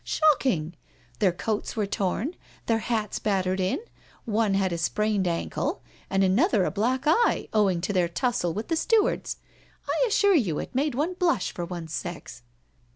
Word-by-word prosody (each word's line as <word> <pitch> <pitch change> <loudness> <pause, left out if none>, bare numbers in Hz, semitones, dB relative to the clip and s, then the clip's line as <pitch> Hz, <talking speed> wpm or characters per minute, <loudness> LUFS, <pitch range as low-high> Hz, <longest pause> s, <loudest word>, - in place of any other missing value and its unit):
Shocking! 255 - +2 0.5
their 190 - +4
coats 210 +4 -3
were 215 -2 0
torn, 205 - -2 0.3
their 225 -1 +2
hats 220 -2 -2
battered 190 -2 0
in, 185 +1 +1 0.5
one 215 -2 +1
had 190 -2 +1
a - - -2
sprained 210 +3 0
ankle, 225 - -2 0.3
and 195 0 +2
another 200 - +3
a - - -1
black 250 +6 0
eye, 450 +11 +3
owing 195 -5 +2
to 195 +3 -2
their 180 -3 +2
tussle 175 0 0
with 215 - -4
the 330 - +2
stewards. 430 +6 +1 0.5
I - - +2
assure 405 -2 +4
you 205 - +2
it - - -5
made 275 +1 0
one 310 +7 0
blush 350 - +1
for 175 - -4
one's 170 -3 -6
sex." 175 -8 -6
210 Hz, 165 wpm, -26 LUFS, 185-270 Hz, 0.5 s, their